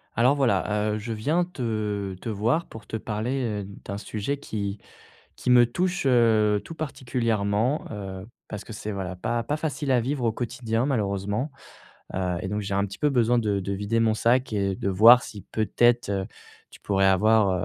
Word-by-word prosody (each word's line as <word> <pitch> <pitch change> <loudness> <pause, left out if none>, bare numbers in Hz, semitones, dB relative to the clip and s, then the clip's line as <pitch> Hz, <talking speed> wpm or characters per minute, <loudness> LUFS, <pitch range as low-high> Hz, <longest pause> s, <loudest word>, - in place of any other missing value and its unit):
Alors 125 +5 +4
voilà, 110 -6 +1
heu, 105 - -1
je 115 +2 -4
viens 155 +11 +1
te 105 - -3
te 115 - -5
voir 115 +10 0
pour 110 -1 -12
te 110 - -3
parler, 115 +5 -2 0.2
heu, - - -6 0.2
d'un 100 - -4
sujet 110 +7 -3
qui 100 -6 -4 0.6
qui - - -2
me 120 -1 +7
touche, 180 +9 -1
heu, 110 -4 +4
tout 165 - -8
particulièrement, 120 -4 -1
heu, 95 -2 -6 0.2
parce 105 -1 -6
que - - -9
c'est, 105 0 -5
voilà, 95 -2 -4
pas 115 +6 -1
pas 145 +6 -2
facile 150 -2 -3
à 125 -2 +4
vivre 130 +2 -2
au 115 - +2
quotidien 120 0 -2
malheureusement. 105 0 -1 0.6
Heu 90 -1 -1
et - - -3
donc 105 +2 -2
j'ai 100 0 -3
un 100 +1 +2
petit 100 -1 -7
peu 150 - +2
besoin 120 -2 +3
de 105 -3 0
de 100 +1 -3
vider 105 +4 0
mon 110 -1 +3
sac 120 +3 +2
et 100 -2 0
de 95 - -3
voir 115 +6 +8
si 105 -3 -9
peut-être, 120 +2 +2
heu, 95 -1 -1 0.4
tu - - -15
pourrais 95 -1 +2
avoir, 105 +2 +4
110 Hz, 190 wpm, -25 LUFS, 100-125 Hz, 0.6 s, voir